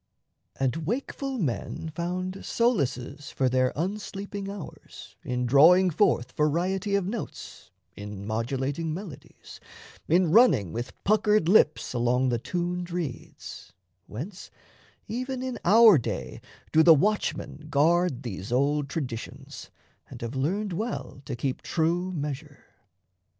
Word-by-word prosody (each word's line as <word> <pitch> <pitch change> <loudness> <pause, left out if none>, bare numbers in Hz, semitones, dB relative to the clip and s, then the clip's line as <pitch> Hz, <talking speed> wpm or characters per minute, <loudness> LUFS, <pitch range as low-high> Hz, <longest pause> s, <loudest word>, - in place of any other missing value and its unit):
And 140 +4 -1
wakeful 270 +3 -3
men 160 - -3
Found 185 +3 -4
solaces 145 - -1
for 130 - 0
their 130 0 +2
unsleeping 195 +3 -4
hours 200 -5 -10
In 125 0 -2
drawing 170 +9 +6
forth 150 - +2
variety 185 +7 0
of 200 -2 +1
notes, 205 - -7 0.3
In 105 -1 -7
modulating 135 +8 -2
melodies, 180 -7 -10 0.5
in 175 0 +3
running 150 - +5
With 120 +1 -5
puckered 210 -3 +3
lips 170 -9 +3
along 125 +2 +1
the 120 -1 0
tuned 175 +5 -3
reeds, 170 -8 -6 0.3
Whence, 175 - -8 0.6
even 255 +2 -4
in 255 -2 -4
our 215 -2 +7
day 120 - -5 0.3
do 160 - +5
the 165 0 +8
watchmen 155 -3 -1
guard 155 -1 +2
These 100 -3 -6
old 140 +3 +1
traditions, 130 -7 -6 0.4
and - - -10
have 115 - -4
learned 180 +9 -1
well 215 - -4
To 130 - -4
keep 130 +2 -3
true 175 +3 0
measure. 150 -2 -6
160 Hz, 120 wpm, -27 LUFS, 130-195 Hz, 0.6 s, the